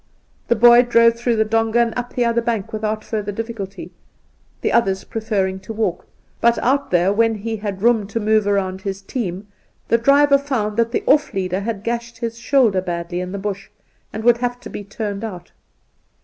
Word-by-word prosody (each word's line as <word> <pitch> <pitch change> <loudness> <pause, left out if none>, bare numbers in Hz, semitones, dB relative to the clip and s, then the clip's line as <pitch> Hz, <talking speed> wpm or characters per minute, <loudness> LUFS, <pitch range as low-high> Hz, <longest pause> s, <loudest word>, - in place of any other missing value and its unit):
The 235 - +3
boy 240 +2 +7
drove 230 -1 +4
through 235 0 -1
the 220 0 +2
douga 225 +1 +1
and 235 -1 +2
up 245 0 -5
the 245 - +1
other 235 0 +1
bank 225 -4 -3
without 215 0 -2
further 210 -2 -3
difficulty, 215 -2 -6 0.7
the - - 0
others 195 -4 +1
preferring, 200 -4 -2
to 190 +4 -8
walk; 210 -5 -2 0.3
but 235 0 +3
out 275 +3 +1
there, 180 +2 +2
when 225 +1 +2
he 220 +2 -4
had 205 -2 -5
room 230 -4 +3
to 220 +2 -3
move 215 -1 +2
round 190 -2 0
his 195 0 -5
team, 195 -4 -4 0.4
the 230 - +3
driver 280 +3 +5
found 240 -7 -2
that 230 0 +1
the - - -1
off 290 -5 +3
leader 185 -1 -1
had 205 -1 -4
gashed 235 0 -4
his 230 0 -5
shoulder 235 -6 +2
badly 175 -1 -4
in 180 0 -5
the 200 - -4
bush, 195 0 -5 0.4
and 220 - -6
would 240 0 +5
have 245 0 -2
to 220 - -9
be 205 - -6
turned 205 0 -5
out. 180 -6 -7
220 Hz, 195 wpm, -20 LUFS, 195-235 Hz, 0.7 s, boy